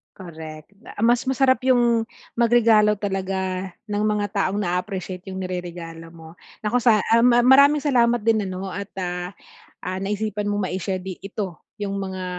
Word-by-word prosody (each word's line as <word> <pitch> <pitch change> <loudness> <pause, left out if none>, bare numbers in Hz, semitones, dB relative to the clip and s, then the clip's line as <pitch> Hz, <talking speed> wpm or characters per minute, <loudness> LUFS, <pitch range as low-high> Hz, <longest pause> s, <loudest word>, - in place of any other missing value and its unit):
Correct 160 -2 -10
da - - -13
mas 240 +1 +3
masarap 265 0 +3
'yong 240 -3 +3 0.3
magregalo 225 -3 +4
talaga, 190 -1 -3 0.2
ng 210 0 -1
mga 210 -1 0
taong 200 -1 0
na-a-appreciate 185 0 -3
'yong 190 0 -5
nireregalo 175 -2 -6
mo 160 0 -13 0.3
nako, 215 +3 +1
sa 225 -3 +4 0.2
um, 230 - +4
ma 240 0 +5
mar 265 +3 +8
maraming 295 0 -1
salamat 240 -4 +3
din 220 -3 +2
ano 185 +1 -5
at, 200 +1 -6
ah 180 0 -3 0.5
ah, 185 +1 -3
naisipan 210 +1 -2
mong 205 -1 -1
ma-i-share 185 +1 -3
di 185 -1 -6
ito 195 -4 -5 0.2
'yong 200 -1 -3
mga, 190 -1 -4
200 Hz, 160 wpm, -23 LUFS, 185-230 Hz, 0.5 s, mar